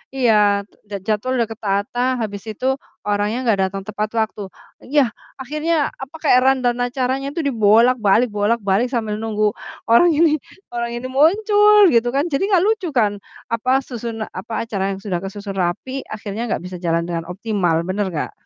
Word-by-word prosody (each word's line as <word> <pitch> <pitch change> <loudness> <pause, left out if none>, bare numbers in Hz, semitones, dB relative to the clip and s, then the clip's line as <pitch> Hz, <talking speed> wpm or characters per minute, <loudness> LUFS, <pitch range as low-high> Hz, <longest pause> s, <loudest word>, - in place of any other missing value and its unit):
iya, 210 -5 +3 0.2
j - - -26 0.2
jadwal 220 +4 0
udah 230 - +1
ketata, 205 +2 -2 0.2
habis 205 -3 -4
itu 235 +5 -7 0.4
orangnya 210 +4 0
nggak 220 -5 +2
datang 195 +1 -6
tepat 215 0 -2
waktu, 220 -1 -2 0.5
iya, 275 -4 +2 0.3
akhirnya 305 +3 -1
apa, 280 +4 -10
kayak 255 -4 +5
rundown 255 -2 +2
dan 245 - +1
acaranya 265 +1 -1
itu 335 - -1
dibolak-balik 230 -2 +4
bolak-balik 205 +1 +1
sambil 220 -4 -1
nunggu 215 -1 0 0.4
orang 325 +7 +6
ini 310 -1 +3 0.3
orang 235 0 -3
ini 245 +2 -5
muncul 415 +6 +5
gitu 235 -1 +3
kan. 280 - +2
Jadi 275 - 0
nggak 375 -4 +3
lucu 430 -4 0
kan, 205 -3 +2 0.3
apa, 255 +4 +1
susuna 230 -3 -5
apa, 220 +5 -4
acara 210 -4 -3
yang - - -10
sudah 185 -4 -2
kesusun 200 0 -6
rapi, 175 +8 -2 0.2
akhirnya 215 +2 -5
nggak 190 - -2
bisa 180 0 -7
jalan 170 -1 0
dengan 170 -1 -4
optimal, 180 -3 -1
bener 190 +3 -2
nggak? 155 - -3
225 Hz, 165 wpm, -20 LUFS, 205-260 Hz, 0.5 s, orang